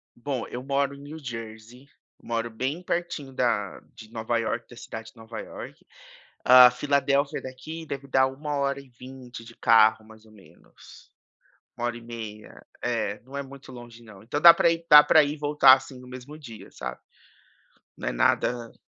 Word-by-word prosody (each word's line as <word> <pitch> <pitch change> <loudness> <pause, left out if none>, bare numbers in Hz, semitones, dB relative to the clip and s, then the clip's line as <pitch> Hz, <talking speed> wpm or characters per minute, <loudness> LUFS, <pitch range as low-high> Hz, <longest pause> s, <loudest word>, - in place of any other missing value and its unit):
Bom, 125 -1 -4
eu 125 - -7
moro 140 0 0
em 140 - -13
New 150 +3 -9
Jersey, 115 0 -9 0.3
moro 115 0 -3
bem 135 +9 -4
pertinho 170 -6 -4
da 115 -7 -1 0.2
de 110 0 -13
Nova 115 +1 -2
Iorque, 115 +1 -3
da 120 - -14
cidade 110 -2 -9
de - - -30
Nova 110 0 -8
Iorque. - - -11 0.6
A 125 0 +9
Filadélfia 140 +1 0
daqui 155 +6 -8
deve 140 -1 -7
dar 130 -1 +3
1 145 +2 -5
hora 140 0 -1
e 140 -1 -15
20 125 -1 -11
de 115 0 -14
carro 110 -1 +4
mais 110 0 -17
ou 110 - -19
menos, 95 -6 -19 0.7
1 120 - -3
hora 120 - -4
e 120 - -12
meia. 110 -2 -10 0.2
É, 115 -4 -2
não 130 +4 -13
é 140 - -3
muito 135 0 -13
longe 120 -2 -12
não. 110 -3 -15
Então 135 +6 -3
dá 170 -1 +11
pra 170 - +3
ir 165 0 -4
dá 150 -1 +10
pra 155 0 +5
ir 145 - -2
e 150 - -9
voltar, 145 -3 +6
assim, 130 -1 -2
no 125 - -14
mesmo 130 +4 -10
dia, 115 -7 -12
sabe, - - -7 1.0
não - - -4
é - - -2
nada 120 - 0
125 Hz, 190 wpm, -25 LUFS, 115-140 Hz, 1.0 s, dá